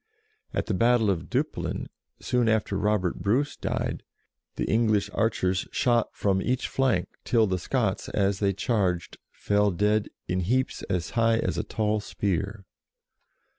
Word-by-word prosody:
At -, -, -1 dB
the 110 Hz, -, -1 dB
battle 115 Hz, +1 st, +3 dB
of 85 Hz, -4 st, -3 dB
Dup -, -, 0 dB
plin, -, -, -4 dB, 0.3 s
soon 120 Hz, -2 st, +1 dB
after 110 Hz, -2 st, +1 dB
Robert 105 Hz, -3 st, 0 dB
Bruce 135 Hz, +8 st, +1 dB
died, -, -, -2 dB, 0.5 s
the -, -, -1 dB
English 105 Hz, -2 st, +2 dB
archers 95 Hz, -4 st, 0 dB
shot 120 Hz, -2 st, +2 dB
from 95 Hz, -2 st, +1 dB
each 125 Hz, +5 st, 0 dB
flank 125 Hz, -10 st, +1 dB
till 115 Hz, -2 st, +3 dB
the 95 Hz, -3 st, -1 dB
Scots, 110 Hz, +1 st, -1 dB
as 100 Hz, -1 st, +1 dB
they 100 Hz, -1 st, +2 dB
charged, 95 Hz, -4 st, -1 dB
fell 105 Hz, 0 st, +1 dB
dead 105 Hz, +3 st, +1 dB, 0.2 s
in 90 Hz, -, 0 dB
heaps 125 Hz, +9 st, 0 dB
as 90 Hz, -3 st, -1 dB
high 115 Hz, 0 st, +3 dB
as -, -, -1 dB
a -, -, 0 dB
tall 110 Hz, -1 st, 0 dB
spear. 100 Hz, 0 st, -2 dB
105 Hz, 150 wpm, -27 LUFS, 95-115 Hz, 0.5 s, battle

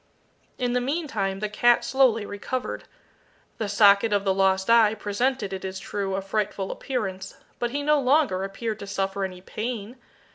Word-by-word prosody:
In 245 Hz, -1 st, -1 dB
the 250 Hz, -, +1 dB
meantime 235 Hz, -, -2 dB
the 215 Hz, -, 0 dB
cat 240 Hz, +3 st, +3 dB
slowly 250 Hz, -5 st, +3 dB
recovered. 225 Hz, +6 st, -4 dB, 0.7 s
The 215 Hz, -2 st, -2 dB
socket 205 Hz, +1 st, +5 dB
of 200 Hz, -1 st, +2 dB
the 195 Hz, -1 st, +2 dB
lost 190 Hz, 0 st, +2 dB
eye 225 Hz, -2 st, +5 dB
presented, 210 Hz, +1 st, -1 dB
it 190 Hz, -, -5 dB
is 190 Hz, 0 st, -4 dB
true, 195 Hz, -1 st, -3 dB
a 195 Hz, -, -3 dB
frightful 195 Hz, -1 st, -2 dB
appearance, 195 Hz, -8 st, -4 dB, 0.2 s
but 240 Hz, -, 0 dB
he 285 Hz, +4 st, -3 dB
no 300 Hz, 0 st, +3 dB
longer 265 Hz, -8 st, +2 dB
appeared 215 Hz, +3 st, -4 dB
to 200 Hz, -, -7 dB
suffer 195 Hz, 0 st, -2 dB
any 185 Hz, -1 st, -5 dB
pain. 225 Hz, +3 st, -5 dB
210 Hz, 170 wpm, -25 LUFS, 195-245 Hz, 0.7 s, socket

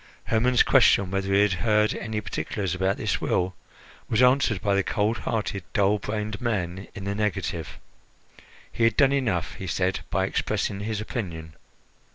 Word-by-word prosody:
Hermon's 120 Hz, +3 st, +3 dB
question 95 Hz, -2 st, +4 dB
whether 95 Hz, 0 st, -1 dB
he 100 Hz, +1 st, +5 dB
had 105 Hz, -2 st, +2 dB
heard 105 Hz, -2 st, +3 dB
any 110 Hz, 0 st, -4 dB
particulars 95 Hz, 0 st, -3 dB
about 95 Hz, +1 st, 0 dB
this -, -, -1 dB
will 90 Hz, +1 st, 0 dB, 0.6 s
was 110 Hz, -, +1 dB
answered 125 Hz, -4 st, +4 dB
by 100 Hz, +1 st, 0 dB
the 100 Hz, -, +3 dB
cold 105 Hz, +3 st, 0 dB
hearted, 105 Hz, -5 st, -2 dB
dull 105 Hz, +1 st, +2 dB
brained 105 Hz, 0 st, -4 dB
man 95 Hz, -5 st, -2 dB
in 95 Hz, -, -7 dB
the 100 Hz, +1 st, -2 dB
negative. 95 Hz, -6 st, -3 dB, 0.9 s
He 115 Hz, -, -2 dB
had 115 Hz, -1 st, +3 dB
done 140 Hz, -1 st, +5 dB
enough, 115 Hz, -11 st, 0 dB
he -, -, -7 dB
said, -, -, 0 dB
by -, -, +1 dB
expressing 100 Hz, -, -1 dB
his 105 Hz, +1 st, -3 dB
opinion. 85 Hz, -, -5 dB
105 Hz, 165 wpm, -25 LUFS, 95-110 Hz, 0.9 s, he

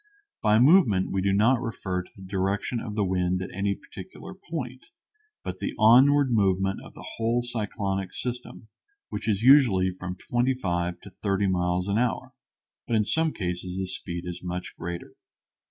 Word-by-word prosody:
By 105 Hz, -1 st, +4 dB
movement 120 Hz, -, +5 dB
we 95 Hz, -, 0 dB
do 100 Hz, +1 st, +1 dB
not 115 Hz, +6 st, +3 dB
refer 95 Hz, -6 st, -3 dB
to 90 Hz, -, -16 dB
the 95 Hz, -, -12 dB
direction 100 Hz, +5 st, -1 dB
of 105 Hz, -2 st, -6 dB
the 105 Hz, -2 st, +1 dB
wind 90 Hz, -1 st, 0 dB
at 95 Hz, -, -6 dB
any 100 Hz, +1 st, 0 dB
particular 95 Hz, -, -11 dB
point, 145 Hz, -9 st, -7 dB, 0.6 s
but -, -, -5 dB
the -, -, -3 dB
onward 130 Hz, +5 st, +6 dB
movement 95 Hz, -3 st, +2 dB
of -, -, -13 dB
the -, -, -10 dB
whole 115 Hz, +2 st, +1 dB
cyclonic 100 Hz, -5 st, -3 dB
system, 125 Hz, -1 st, -6 dB, 0.4 s
which -, -, -4 dB
is 105 Hz, 0 st, 0 dB
usually 120 Hz, -9 st, +6 dB
from 90 Hz, 0 st, -6 dB
twenty 120 Hz, +6 st, 0 dB
five 85 Hz, -6 st, -2 dB
to 100 Hz, -, -12 dB
thirty 100 Hz, +1 st, -1 dB
miles 90 Hz, -1 st, 0 dB
an 100 Hz, +2 st, +1 dB
hour, 125 Hz, -1 st, -1 dB, 0.5 s
but 120 Hz, -, 0 dB
in 105 Hz, -1 st, +2 dB
some 160 Hz, +7 st, +1 dB
cases 90 Hz, -3 st, -4 dB
the 95 Hz, -, -1 dB
speed 90 Hz, -2 st, -5 dB
is 90 Hz, 0 st, -6 dB
much 90 Hz, 0 st, -5 dB
greater. 85 Hz, 0 st, -6 dB
100 Hz, 170 wpm, -26 LUFS, 95-120 Hz, 0.6 s, onward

